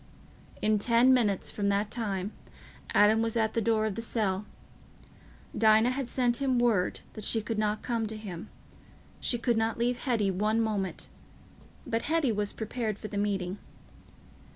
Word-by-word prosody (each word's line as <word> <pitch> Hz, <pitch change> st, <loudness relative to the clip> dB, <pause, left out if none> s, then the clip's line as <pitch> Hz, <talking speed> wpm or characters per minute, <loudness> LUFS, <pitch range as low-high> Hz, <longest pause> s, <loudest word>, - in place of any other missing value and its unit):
In 215 Hz, 0 st, +3 dB
ten 235 Hz, +4 st, +5 dB
minutes 210 Hz, -7 st, +1 dB
from 200 Hz, -1 st, -1 dB
that 200 Hz, +1 st, 0 dB
time, 205 Hz, -4 st, -2 dB, 0.6 s
Adam 215 Hz, +2 st, +5 dB
was 230 Hz, 0 st, 0 dB
at 220 Hz, -1 st, +1 dB
the 230 Hz, -, 0 dB
door 220 Hz, 0 st, +2 dB
of 215 Hz, -, -1 dB
the 230 Hz, -, -4 dB
cell. 210 Hz, -3 st, -1 dB, 1.1 s
Dinah 220 Hz, +2 st, +5 dB
had 260 Hz, -1 st, -3 dB
sent 245 Hz, -2 st, +1 dB
him 260 Hz, -2 st, +2 dB
word 230 Hz, -7 st, +1 dB
that 215 Hz, -, -8 dB
she 225 Hz, -, +2 dB
could 220 Hz, 0 st, -3 dB
not 210 Hz, 0 st, -1 dB
come 230 Hz, -3 st, -1 dB
to 220 Hz, 0 st, -6 dB
him; 190 Hz, -5 st, -8 dB, 0.7 s
she 240 Hz, -, +1 dB
could 235 Hz, -1 st, +1 dB
not 225 Hz, 0 st, 0 dB
leave 240 Hz, +1 st, 0 dB
Hetty 225 Hz, -7 st, +1 dB
one 210 Hz, +4 st, +1 dB
moment; 210 Hz, -4 st, -2 dB, 0.8 s
but 225 Hz, 0 st, -1 dB
Hetty 315 Hz, -4 st, +1 dB
was 205 Hz, -1 st, -1 dB
prepared 220 Hz, -1 st, -3 dB
for 215 Hz, -, -7 dB
the 205 Hz, -, -5 dB
meeting. 195 Hz, -2 st, -2 dB
220 Hz, 165 wpm, -29 LUFS, 205-235 Hz, 1.1 s, ten